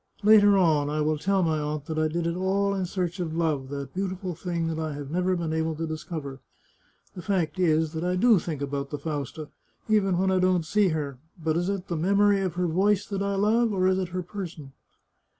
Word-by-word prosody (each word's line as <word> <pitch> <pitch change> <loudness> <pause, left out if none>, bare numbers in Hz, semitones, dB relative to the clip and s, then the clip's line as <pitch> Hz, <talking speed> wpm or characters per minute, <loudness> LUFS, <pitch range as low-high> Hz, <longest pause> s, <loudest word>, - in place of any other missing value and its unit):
Later 205 -1 +7
on 155 -6 +3
I 150 +1 -1
will 155 0 0
tell 195 +2 +1
my 160 -2 +1
aunt 150 -1 -3
that 155 0 -3
I 155 - +2
did 165 +2 -2
it 170 0 -1
all 195 +2 +1
in 190 -2 -2
search 180 0 -3
of 165 -3 -3
love, 150 -6 0
that 140 -1 -6
beautiful 190 -1 -3
thing 170 0 -3
that 160 -1 -2
I 155 -1 -3
have 145 -1 -7
never 180 +2 +1
been 165 -2 -2
able 160 0 -1
to 165 +2 -3
discover. 155 -3 -6 0.7
The 180 - -8
fact 175 -3 -1
is 160 -2 +2
that 160 +1 -3
I 180 +1 0
do 220 +1 +5
think 155 -4 -4
about 140 0 -3
Fausta, 145 0 -5 0.4
even 200 -4 +2
when 190 +1 +2
I 185 - +2
don't 185 -2 +2
see 205 +4 +2
her; 145 -6 -3 0.2
but 160 -2 -1
is 175 +2 0
it 195 -2 -3
the 170 - -2
memory 200 +4 +3
of 185 -3 -2
her 180 0 0
voice 195 +4 +2
that 195 -2 -4
I 200 0 0
love, 220 +3 +2
or 185 -2 +1
is 190 0 +2
it 185 - -1
her 180 +1 -3
person 170 -7 -7
175 Hz, 225 wpm, -26 LUFS, 155-190 Hz, 0.7 s, Later